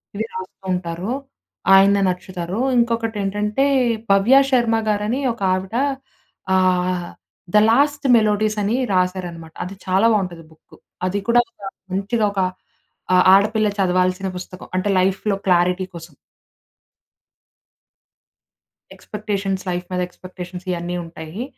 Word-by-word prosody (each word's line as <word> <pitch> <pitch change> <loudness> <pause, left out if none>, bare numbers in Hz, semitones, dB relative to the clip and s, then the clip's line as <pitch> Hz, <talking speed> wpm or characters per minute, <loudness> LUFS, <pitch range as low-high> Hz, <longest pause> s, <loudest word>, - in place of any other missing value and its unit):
ఇవి 220 +2 -2
రాస్తూ 185 +1 -9
ఉంటారు. 180 +4 -3 0.6
ఆయన 200 +1 +5
నచ్చుతారు. 180 +1 -4 0.2
ఇంకొకటి 230 -2 0
ఏంటంటే 210 +6 0 0.5
'భవ్య 200 +7 +5
శర్మ' 235 -3 +2
గారని 210 +5 0
ఒక 235 - -17
ఆవిడ 190 +3 -4 0.8
ఆహ్, 180 -1 +1 0.5
'ద - - +6
లాస్ట్ 285 +3 +2
మెలోడీస్' 215 0 +1
అని 215 +5 0 0.2
రాశారనమాట. 180 -3 -2
అది 190 +2 -8
చాలా 190 +4 +3
బావుంటది 180 -5 -2
బుక్. 160 - -20 0.3
అది 195 +2 -1
కూడా 240 +1 +6 0.5
మంచిగా 210 +4 0
ఒక 195 - 0 0.7
ఆ - - +6 0.2
ఆడపిల్ల 215 +2 +3
చదవాల్సిన 185 0 +1
పుస్తకం 185 0 -9
అంటే 185 +2 0
లైఫ్‌లొ 195 +2 +1
క్లారిటీ 180 0 +2
కోసం. 165 -1 -10 2.8
ఎక్స్పెక్టేషన్స్ 200 -3 -4
లైఫ్ 180 0 -3
మీద 180 0 -1
ఎక్స్పెక్టేషన్స్ 180 0 -10
ఇయన్నీ 175 0 -3
ఉంటాయి. 165 +5 -7
190 Hz, 110 wpm, -20 LUFS, 180-215 Hz, 2.8 s, ద